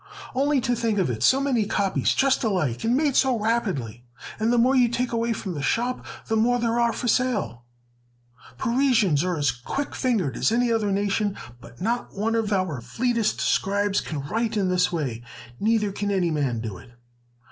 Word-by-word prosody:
"Only 280 +2 +2
to 245 - 0
think 230 -2 -1
of 180 -10 +1
it, 110 - -5
so 265 - +5
many 255 -7 +1
copies 200 -2 +1
just 270 -1 +2
alike, 180 - -1
and 235 +3 +2
made 290 -3 +1
so 260 -3 +3
rapidly! 190 - -2 0.4
And 220 +2 +1
the 245 - +2
more 250 +3 +4
you 245 -2 +4
take 245 +1 -1
away 230 0 0
from 200 -4 -4
the 145 - -5
shop, 245 - -1 0.2
the 225 - -1
more 240 +3 +3
there 235 0 0
are 235 -1 +3
for 245 - -4
sale! 210 - 0 0.9
Parisians 235 - +2
are 180 -2 -1
as 145 -4 +2
quick 125 - -5
fingered 215 - 0
as - - +1
any 240 +1 +2
other 215 -3 +1
nation, 200 +1 0 0.2
but 120 -1 -15
not 235 +5 -2
one 220 +3 0
of 225 -2 0
our 185 -10 -1
fleetest 230 - -1
scribes 200 +1 +1
can 155 -3 -5
write 220 +9 -2
in 195 -2 +1
this 180 -1 +2
way; 135 -9 -3 0.4
neither 215 -1 +1
can 205 +1 -3
any 185 -4 +1
man 135 -7 -1
do 105 -5 -6
it!" 115 - -15
215 Hz, 190 wpm, -24 LUFS, 175-240 Hz, 0.9 s, so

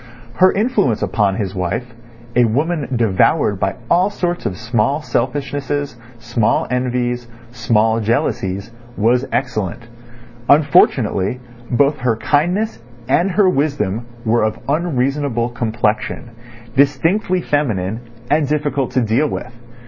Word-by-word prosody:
Her 185 0 +6
influence 195 - +1
upon 100 0 +1
his 100 -4 -3
wife, 95 +7 -3 0.4
a 125 0 +5
woman 145 +5 0
devoured 110 - +2
by 95 0 0
all 180 +7 +3
sorts 175 -3 -2
of 90 - -4
small 120 +6 0
selfishnesses, 145 +2 -2 0.2
small 120 -1 0
envies, 125 -1 -1 0.2
small 110 -1 +1
jealousies, 100 -2 -1 0.3
was 120 +5 +2
excellent. 120 -5 -2 0.7
Unfortunately, 125 -7 +3 0.3
both 140 +4 +2
her 125 -3 +1
kindness 175 - 0 0.3
and 180 +3 +2
her 190 +1 +3
wisdom 135 - 0 0.2
were 115 +1 +2
of 110 0 0
unreasonable 140 -5 0
complexion, 115 0 -2 0.4
distinctly 165 +8 +2
feminine, 110 -8 -1 0.3
and 150 -1 +3
difficult 145 -2 -1
to 130 - +2
deal 120 +7 +1
with. 125 - -6
125 Hz, 115 wpm, -18 LUFS, 110-145 Hz, 0.7 s, Her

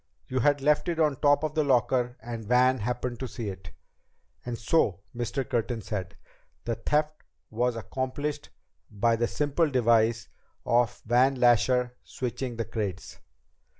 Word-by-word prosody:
You 130 - -1
had 145 +3 +2
left 150 +4 +2
it 165 -1 -2
on 150 -4 +2
top 145 +2 +3
of 155 0 -2
your 155 -1 +2
locker 125 -1 +1
and 115 -1 -6
Van 125 +2 +4
happened 120 +2 -3
to 130 - -3
see 115 -3 -5
it." 95 -4 -9 0.7
"And 120 -1 -4
so," 105 - +1
Mr. 120 +2 -3
Curtin 115 -2 -2
said, 95 -3 -5 0.5
"the 115 - -1
theft 150 +6 -1 0.3
was 120 +2 0
accomplished 145 +5 -4 0.4
by 115 +2 +1
the 120 +1 0
simple 150 +4 0
device 115 - +2 0.4
of 120 -1 +1
Van 125 +4 +3
Lasher 125 0 +3
switching 125 0 -4
the 115 0 -3
crates." 105 -5 -5
125 Hz, 150 wpm, -27 LUFS, 115-135 Hz, 0.7 s, Van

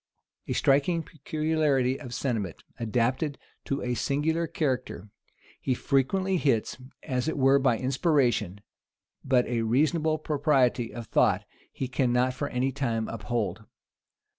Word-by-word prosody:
A - - -1
striking 145 +5 +2
peculiarity 155 -4 0
of 125 - -8
sentiment 115 - -3 0.2
adapted 125 +6 0 0.3
to 140 - -2
a 125 0 -1
singular 155 +7 0
character, 130 - -2 0.5
he 130 - 0
frequently 185 +10 +1
hits, 130 -9 +1 0.3
as 125 +1 -2
it 160 - -1
were 135 0 +5
by 130 -4 +2
inspiration; 130 - +1 0.6
but 125 -2 +3
a 120 -2 -1
reasonable 155 +7 +2
propriety 140 -6 +1
of 120 -1 -7
thought - - +2 0.3
he 130 - -4
cannot 125 0 +1
for 140 +2 -3
any 130 +2 0
time 115 -5 -1
uphold. 110 0 -3
130 Hz, 125 wpm, -27 LUFS, 120-150 Hz, 0.6 s, were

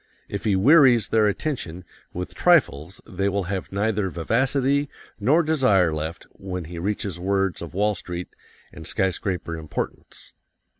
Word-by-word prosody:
If 100 +2 -5
he 105 -3 +3
wearies 125 - +5
their 110 -1 +3
attention 100 - -3 0.3
with 90 +1 -6
trifles 95 - +2
they 100 +2 -1
will 100 0 -1
have 95 +1 -4
neither 100 0 0
vivacity 135 - +1 0.3
nor 155 +6 +3
desire 130 - +3
left 80 +2 -4
when 90 -2 -6
he 85 +1 -7
reaches 100 -1 -3
words 95 0 0
of 85 -1 -8
Wall 105 +2 +2
Street 90 -1 -6 0.4
and - - -9
skyscraper 90 -2 -2
importance. 80 -1 -6
95 Hz, 140 wpm, -24 LUFS, 90-115 Hz, 0.4 s, wearies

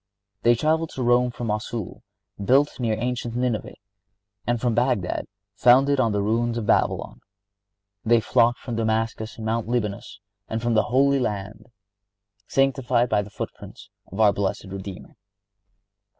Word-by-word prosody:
They 120 0 +5
traveled 160 +5 +1
to 130 - -2
Rome 120 +1 +3
from 120 0 -6
Mossul, 105 -1 -4 0.4
built 135 +7 +3
near 115 -3 0
ancient 120 0 -3
Nineveh, 125 -3 -2 0.7
and 120 -1 +1
from 120 -1 0
Bagdad, 120 -6 0 0.3
founded 130 +6 +4
on 115 -4 +2
the 100 -1 0
ruins 115 +2 0
of 115 - -3
Babylon. - - 0 0.8
They 120 +1 +4
flocked 115 +2 +2
from 120 -4 -6
Damascus 110 0 -1
and 110 - -6
Mount 110 0 -1
Libanus 105 -4 -3 0.3
and 110 - -3
from 120 +1 0
the 110 - +3
Holy 140 +2 +3
Land, 105 -1 -4 0.8
sanctified 130 -3 +1
by 105 -1 +2
the 100 - -9
footprints - - -9 0.2
of 95 - -7
our 105 -2 +5
blessed 100 0 -2
Redeemer. 95 0 -8
115 Hz, 145 wpm, -24 LUFS, 110-125 Hz, 0.8 s, They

